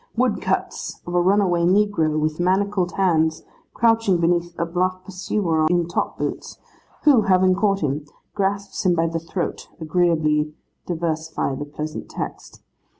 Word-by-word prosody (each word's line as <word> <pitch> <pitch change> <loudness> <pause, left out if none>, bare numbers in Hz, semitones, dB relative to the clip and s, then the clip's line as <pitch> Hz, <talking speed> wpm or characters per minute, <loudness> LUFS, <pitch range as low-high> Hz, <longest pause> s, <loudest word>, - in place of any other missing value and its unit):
Woodcuts 250 -2 -1
of 175 - -6
a 175 - +3
runaway 185 -2 +3
negro 175 -5 +2
with 155 +1 -1
manacled 190 0 +1
hands, 160 -4 +1 0.3
crouching 225 -5 +3
beneath 170 0 +1
a 170 - 0
bluff 185 +2 -1
pursuer 185 -4 0
in 175 -1 +1
top 170 - -2
boots, - - -4 0.5
who, 280 -7 +6
having 185 0 +5
caught 195 +1 +1
him, 150 0 -2 0.3
grasps 200 0 -2
him 180 -2 +3
by 165 0 +2
the 165 0 -2
throat, 165 +2 -4
agreeably 155 -2 +1 0.3
diversify 160 -4 -2
the 145 +2 -5
pleasant 150 +1 -6
text. - - -7
175 Hz, 140 wpm, -22 LUFS, 160-195 Hz, 0.5 s, who